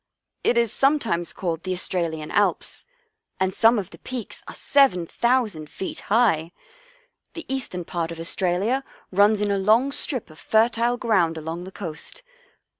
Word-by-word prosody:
It 240 Hz, -, +3 dB
is 235 Hz, -3 st, +2 dB
sometimes 240 Hz, -, +1 dB
called 170 Hz, -3 st, -3 dB
the 185 Hz, +1 st, -2 dB
Australian 165 Hz, -4 st, -2 dB
Alps, 205 Hz, -, 0 dB, 0.5 s
and 190 Hz, 0 st, +1 dB
some 230 Hz, +4 st, +5 dB
of 200 Hz, -2 st, -4 dB
the -, -, -13 dB
peaks 250 Hz, -4 st, -6 dB
are -, -, -7 dB
7,000 235 Hz, -, +2 dB
feet 190 Hz, -, -6 dB
high. 195 Hz, -8 st, +3 dB, 0.8 s
The 335 Hz, -, -7 dB
eastern 250 Hz, -10 st, -2 dB
part 170 Hz, -1 st, -3 dB
of 165 Hz, -, -7 dB
Australia 190 Hz, +9 st, 0 dB, 0.3 s
runs 205 Hz, +2 st, +4 dB
in 205 Hz, -1 st, +1 dB
a 200 Hz, -, +1 dB
long 225 Hz, +8 st, +3 dB
strip 260 Hz, -, -2 dB
of 155 Hz, -, -15 dB
fertile 230 Hz, +6 st, +2 dB
ground 190 Hz, -9 st, +2 dB
along 165 Hz, +3 st, -5 dB
the 190 Hz, -, -9 dB
coast. 190 Hz, -, -7 dB
200 Hz, 150 wpm, -24 LUFS, 170-235 Hz, 0.8 s, some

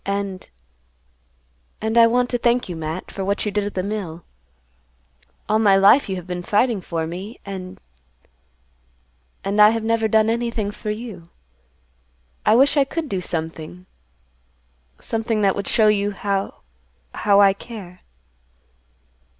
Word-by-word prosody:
"And—and 60 Hz, -, -8 dB
I 230 Hz, -1 st, +7 dB
want 245 Hz, +1 st, +1 dB
to 245 Hz, -, 0 dB
thank 240 Hz, +1 st, +1 dB
you, 175 Hz, -, -5 dB
Matt, 160 Hz, +2 st, -5 dB
for 195 Hz, -, -5 dB
what 200 Hz, +3 st, -1 dB
you 210 Hz, -, -1 dB
did 205 Hz, 0 st, -1 dB
at 205 Hz, -, -5 dB
the 185 Hz, -, -1 dB
mill. 185 Hz, -5 st, -5 dB, 1.2 s
All 215 Hz, +1 st, +2 dB
my 200 Hz, -3 st, +5 dB
life 200 Hz, +5 st, +5 dB
you 190 Hz, -, -1 dB
have 180 Hz, -2 st, -7 dB
been 180 Hz, -1 st, -4 dB
fighting 210 Hz, +3 st, +1 dB
for 165 Hz, -2 st, -3 dB
me, 185 Hz, +8 st, -7 dB
and—and 60 Hz, -, -8 dB
I 210 Hz, -, +9 dB
have 225 Hz, 0 st, -1 dB
never 225 Hz, 0 st, +1 dB
done 220 Hz, 0 st, +3 dB
anything 230 Hz, -2 st, -1 dB
for 210 Hz, +1 st, -7 dB
you. 215 Hz, -3 st, -5 dB, 1.3 s
I 215 Hz, -, +6 dB
wish 275 Hz, +4 st, +4 dB
I 280 Hz, -, +6 dB
could 310 Hz, +2 st, -4 dB
do 190 Hz, -2 st, -2 dB
something—something 165 Hz, +1 st, -5 dB, 1.6 s
that 195 Hz, -1 st, +3 dB
would 200 Hz, -, -4 dB
show 220 Hz, -2 st, +3 dB
you 205 Hz, -1 st, +2 dB
how—how 65 Hz, -, -2 dB
I 200 Hz, -1 st, +6 dB
care." 195 Hz, -4 st, -10 dB
195 Hz, 135 wpm, -21 LUFS, -, 1.6 s, I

